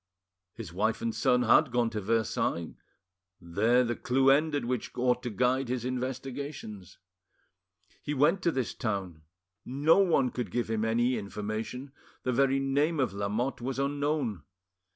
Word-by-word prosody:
His 105 -8 -8
wife 110 +4 0
and 115 -1 -1
his - - -6
son 125 0 +3
had 125 +4 +4
gone 120 -2 +1
to 105 - -3
Versailles, 100 -6 -1 0.7
there 110 +9 +2
the 120 -1 -1
clue 135 +2 +3
ended 145 -1 +2
which 125 -1 -2
ought 125 0 +2
to 125 - -4
guide 125 +3 +1
his 125 -1 -2
investigations. 130 - -5 1.0
He 150 - -3
went 150 +8 +3
to 170 - +2
this 130 -5 -2
town; 95 -7 -3 0.4
no 145 +8 +3
one 160 -10 +3
could 125 -6 -4
give 120 +3 -2
him 110 -1 0
any 120 +3 +1
information, 110 +6 -5 0.3
the 130 - 0
very 135 +2 +3
name 145 +4 +1
of 125 -7 +1
Lamotte 105 +6 -2
was 130 +2 -3
unknown. 140 - -1
125 Hz, 150 wpm, -29 LUFS, 110-135 Hz, 1.0 s, had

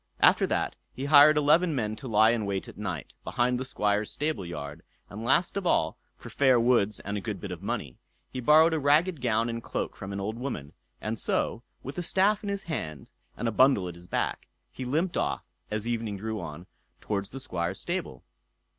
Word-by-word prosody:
After - - +5
that - - -1 0.2
he 135 - -4
hired 150 +1 +8
eleven 155 +3 +4
men 110 -4 -1
to 130 - -7
lie 110 0 +5
in 110 -3 -1
wait 100 -1 -2
at - - -10
night, 95 -8 -5
behind 125 +1 0
the - - -2
Squire's 105 -4 0
stable 150 -9 -2
yard; 75 -4 -7 0.3
and 105 +3 -6
last 135 +9 +2
of 195 -3 -1
all, 80 - +2 0.2
for - - -11
fair 130 -3 +4
words 115 -4 +2
and 100 +1 -3
a - - -9
good - - -4
bit - - -6
of - - -6
money, 60 - -4 0.3
he 130 - -3
borrowed 155 +6 +6
a 160 - +1
ragged 150 +3 +3
gown 115 -1 +1
and 115 0 -3
cloak - - -4
from 95 - -7
an 100 - -4
old 105 +3 -3
woman; 85 - -5 0.3
and 110 +1 -3
so, 115 - 0 0.2
with 135 +6 -5
a - - 0
staff 195 +4 +2
in 205 - -4
his 200 -1 -3
hand, 80 - -5 0.3
and 120 - -2
a - - +1
bundle 130 -5 +4
at 90 - -6
his 85 +1 -14
back, - - -2 0.2
he 130 - -6
limped 160 +8 0
off, - - -1 0.2
as 110 +1 -3
evening 115 -3 -2
drew 110 +2 -4
on, 85 +1 -8 0.3
towards 100 -1 -3
the 135 - -7
Squire's 90 -6 -3
stable. 65 - -4
115 Hz, 210 wpm, -28 LUFS, 100-145 Hz, 0.3 s, hired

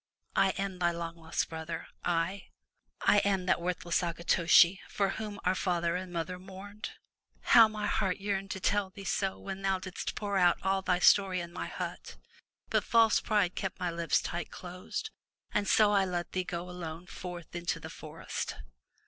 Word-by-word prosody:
I - - +4
am 195 -2 -3
thy 175 -1 +3
long 170 -1 -4
lost 165 -1 -2
brother 160 0 -5
— - - -40 0.2
I! 185 +3 -6 0.5
I 205 - +5
am 195 -2 +1
that 180 - +2
worthless 175 0 0
Akitoshi, 170 +1 +4
for 200 -1 +1
whom 210 0 -5
our 180 - +4
father 175 -2 0
and 185 0 -4
mother 175 +1 -3
mourned. 195 +3 -8 0.5
How 230 -2 +8
my 215 -1 -4
heart 195 -3 +1
yearned 195 -1 -2
to 190 - -4
tell 200 0 +1
thee 195 +1 -10
so 195 -1 -1
when 195 0 -6
thou 195 -1 +1
didst 185 0 -5
pour 200 -2 -1
out 175 -1 +5
all 190 0 +1
thy 180 -1 +2
story 185 0 +5
in 170 0 -6
my - - -4
hut, - - -6 0.6
but - - +3
false 230 -2 +4
pride 205 -5 +1
kept 190 -2 -4
my 180 -1 -1
lips 170 0 +1
tight 170 -1 -4
closed, 185 - -6 0.4
and 205 -1 0
so 210 0 +5
I 200 -1 +4
let 175 -2 -3
thee 185 -1 -1
go 175 0 -4
alone 175 -1 -7
forth 175 -2 -8
into 175 0 -2
the - - -8
forest.'' - - -5
185 Hz, 180 wpm, -31 LUFS, 175-195 Hz, 0.6 s, How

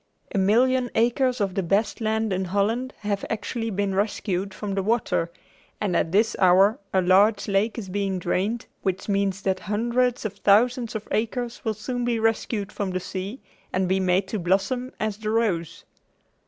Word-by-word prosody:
A - - 0
million 245 +6 +3
acres 245 +2 +2
of 195 -3 0
the 195 - 0
best 200 +6 0
land 220 -1 0
in 190 +1 -1
Holland 215 +7 0
have 205 -1 -2
actually 225 +1 -3
been 200 -1 -1
rescued 195 -1 -1
from 200 +1 -5
the 195 - 0
water, 205 -5 0 0.5
and 200 -4 -1
at 160 - +1
this 220 +4 +3
hour 190 +3 +5
a 190 -1 +2
large 200 +4 +4
lake 205 +3 +1
is 215 -5 -5
being 195 0 -1
drained 190 +6 -1 0.2
which 190 -1 -2
means 195 -1 0
that 190 -1 0
hundreds 235 +4 0
of 210 - -2
thousands 235 +4 +3
of 215 - -5
acres 235 +2 -2
will 220 -2 -1
soon 245 +4 -3
be 240 -1 +1
rescued 220 -2 0
from 200 -2 -3
the 185 0 -2
sea 195 +7 -6 0.3
and 185 0 0
be 190 +1 +2
made 185 +1 +2
to 215 - -2
blossom 200 +9 0
as 215 -2 -2
the 215 0 -4
rose. 210 -8 -1
205 Hz, 180 wpm, -25 LUFS, 190-230 Hz, 0.5 s, hour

